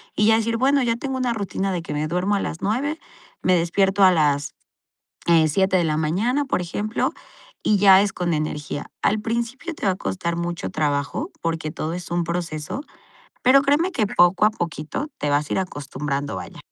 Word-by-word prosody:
y 210 - +3
ya 220 - +6
decir: 230 +1 0
"Bueno, 275 +2 +3
ya 230 -1 +1
tengo 265 +1 -3
una 250 -2 0
rutina 195 -2 -2
de 175 - -2
que 165 - -6
me 150 +1 -1
duermo 180 +5 0
a - - +1
las 165 - -4
9, 275 +10 -1 0.4
me 185 - +3
despierto 190 +3 +2
a 185 - +8
las, 150 -3 +1 0.7
eh, 165 -2 +5
7 190 +4 +2
de 175 - +2
la 155 -1 0
mañana", 210 - 0
por 265 - 0
ejemplo, 205 +5 -2 0.5
y 215 - +3
ya 195 -1 +7
es 200 -1 0
con 175 -1 -1
energía. 150 -1 -3
Al 215 - +2
principio 235 +9 -3
te - - -5
va 195 - +4
a - - -6
costar 170 -2 -3
mucho 175 +2 -3
trabajo 150 - -1
porque 165 -2 -2
todo 155 - -4
es 175 0 -6
un 175 0 +1
proceso, 170 - -4 0.6
pero 260 +2 +6
créeme 305 +7 +2
que 225 -10 +1
poco 190 +1 +4
a - - +4
poquito 175 - -4
te 145 - -1
vas 145 +1 +1
a - - 0
ir - - +1
acostumbrando, 145 -4 -4
vaya. - - -8
185 Hz, 200 wpm, -23 LUFS, 160-225 Hz, 0.7 s, a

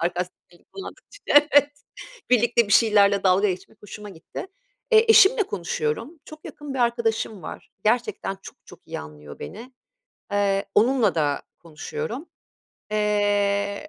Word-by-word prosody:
sarkastik 180 +1 -2 0.2
dili 175 - -22
kullandıkça, - - -11 0.3
"Evet," 290 0 +5 0.6
birlikte 240 -2 +3
bir - - -1
şeylerle 205 -3 +4
dalga 190 +2 +4
geçmek 185 +3 -8
hoşuma 210 0 -10
gitti. 170 - -9 0.4
Eee, 445 0 +6
eşimle 445 +1 +6
konuşuyorum, 195 - -4
çok 310 0 -13
yakın 290 -2 -8
bir - - -4
arkadaşım 230 -5 -1
var. - - -9
Gerçekten 220 -3 -1
çok - - -12
çok - - -15
iyi - - -6
anlıyor 75 -1 -12
beni. 245 - -10 0.6
Eee, 200 -1 +1
onunla 230 -2 +3
da 145 -3 0 0.2
konuşuyorum. 305 - -6 0.6
Eee, 205 +2 0
210 Hz, 130 wpm, -23 LUFS, 190-250 Hz, 0.6 s, Eee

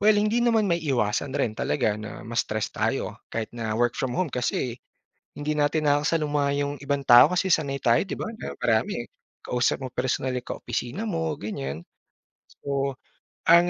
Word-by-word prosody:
well, 210 +1 +5
hindi 215 +3 +2
naman 230 -3 +3
maiiwasan 135 -6 0
rin 110 - +1
talaga 105 +8 0
na 105 -1 -8
ma-stress 110 -2 -1
tayo - - -2
kahit 110 -1 -4
na 115 -2 -3
work 120 0 +2
from 125 -2 -1
home, 180 -6 0
kasi 125 0 -1 0.6
hindi 150 +1 -2
natin 150 +1 +2
nakakasaluma 145 -1 +1
yung 145 0 -2
ibang 140 0 -1
tao 120 +3 +9
kasi 180 +1 +1
sanay 140 -3 +1
tayo, 115 0 +5
'di 190 - -5
ba, - - -4 0.2
na - - -5
marami, - - +1 0.4
kausap 125 0 +1
mo - - -2
personal 130 +1 -1
yung 125 - -5
kaopisina 130 - -3
mo, 165 -7 -1
ganiyan. 80 - -5 0.8
So, 140 -1 -1 0.5
ang 170 +1 +6
140 Hz, 160 wpm, -26 LUFS, 120-160 Hz, 0.8 s, tao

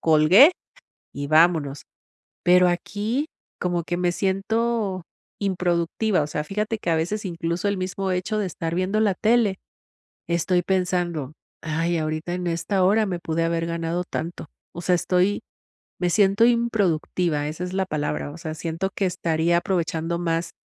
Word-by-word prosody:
colgué 165 - +7 0.6
y 140 0 -4
vámonos", 155 -3 +3 0.6
pero 180 +1 +6
aquí, 210 - -2 0.3
como 175 -2 -1
que 175 +1 -3
me 175 -1 +1
siento 200 0 -1 0.4
improductiva. 180 0 0
O 145 - -2
sea, 150 0 -3
fíjate 210 +5 -2
que, 175 - -3
a 165 - +3
veces, 190 +7 -2
incluso, 170 +1 -2
el 200 - +1
mismo 190 +1 -3
hecho 185 +4 -1
de 210 - 0
estar 165 -1 -4
viendo 185 +4 0
la 205 -4 +2
tele, 220 -3 +2 0.7
estoy 175 +1 +1
pensando: 175 -5 -1 0.3
"Ay, 165 +2 -1
ahorita 155 +2 -2
en 180 0 -4
esta 170 +3 0
hora 210 +3 +3
me 180 -2 -3
pude 165 0 -1
haber 165 0 0
ganado 170 +1 -2
tanto", 165 +2 -5 0.3
o 175 - -6
sea, 180 +1 +1
estoy 180 +3 +1 0.6
me 180 -1 +1
siento 200 +3 +4
improductiva, 180 -9 +1
esa 155 +4 -5
es 180 +1 -4
la 190 -1 0
palabra, 150 -3 -3
o 160 - -10
sea, 160 -1 -5
siento 165 +4 -3
que 195 - 0
estaría 170 -1 +1
aprovechando 170 -2 -1
más 165 -1 -1
175 Hz, 155 wpm, -24 LUFS, 165-195 Hz, 0.7 s, colgué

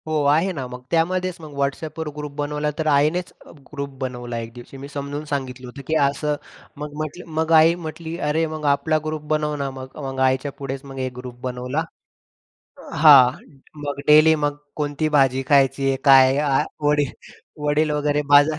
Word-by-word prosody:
हो, 155 - -3
आहे 160 +7 +3
ना, 135 -5 -5
मग 125 0 -9
त्यामध्येच 180 +2 +1
मग 155 -2 -10
WhatsAppवर 155 +3 -3
ग्रुप 150 -1 -6
बनवला, 150 +1 -2
तर 160 -1 -2
आईनेच 155 +6 +1
अ, - - -14 0.2
ग्रुप 140 -1 -4
बनवला 120 -2 -5
एक 115 - -15
दिवशी. 120 +3 -11
मी 135 +1 -8
समजून 145 +1 -5
सांगितलं 130 -2 -4
होतं, 140 +3 -9
की 160 - 0
असं 145 +2 -1 0.5
मग 150 0 -6
म्हटलं 155 +3 -5
मग 160 +1 -1
आई 160 +2 +6
म्हटली 160 +1 -6
"अरे 160 +2 +1
मग 155 -1 -5
आपला" 145 +2 +2
ग्रुप 155 0 -3
"बनव 150 -1 0
ना 140 -1 -3
मग". 130 0 -9
मग 135 -3 -5
आईच्या 130 +2 -2
पुढेच 135 -1 -5
मग 135 -1 -8
एक 130 -1 -3
ग्रुप 125 -1 -8
बनवला. 125 +4 -3 1.0
अ, - - -13
हां. 145 -5 +8 0.5
मग 145 -1 -4
डेलि 155 +1 +7
मग 145 0 0 0.2
कोणती 150 +1 -1
भाजी 135 -1 +3
खायची 135 -1 +3
आहे, 135 - +1
काय 135 -1 +7
आ, 145 -2 +2 0.3
वडील 145 -2 +2 0.5
वडील 150 +1 +2
वगैरे 150 0 0
बाजार 145 +2 +6
145 Hz, 180 wpm, -22 LUFS, 135-155 Hz, 1.0 s, हां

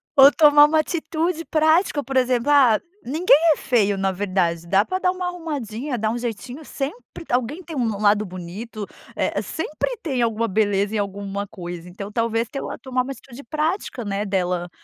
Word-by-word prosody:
ou 275 +1 +9
tomar 295 -1 +7
uma 310 +1 +2
atitude 330 +1 -2
prática 315 +1 +2
por 270 +2 -6
exemplo, 250 +1 +2
ah, 255 -7 +6 0.2
ninguém 305 +3 +4 0.2
é - - -8
feio 205 -5 +1
na 195 0 +1
verdade 180 -3 -1
dá 195 +3 +4
pra 370 0 -2
dar 365 - +2
uma 365 -1 -4
arrumadinha, 285 -7 -4
dar 215 0 0
um 240 - -2
jeitinho, 245 +5 -5
sempre 300 - -6
alguém 255 +9 -1
tem 325 -1 -8
um 250 -4 0
no 205 -2 -3
lado 210 0 +3
bonito, 195 +4 -7 0.3
é - - 0
é, - - -2
sempre 320 +10 -3
tem 265 -7 -1
alguma 230 0 +1
beleza 205 +1 +1
em - - +1
alguma 200 0 -3
coisa, 175 -3 -8
então 200 +3 -8
talvez 230 +1 0
ter 275 - -5
uma - - -5
tomar 255 -1 -1
uma 265 - -6
atitude 270 0 -11
prática, 310 - -2
né, 200 +1 -2
dela, 180 -3 -1
235 Hz, 190 wpm, -22 LUFS, 205-295 Hz, 0.3 s, ou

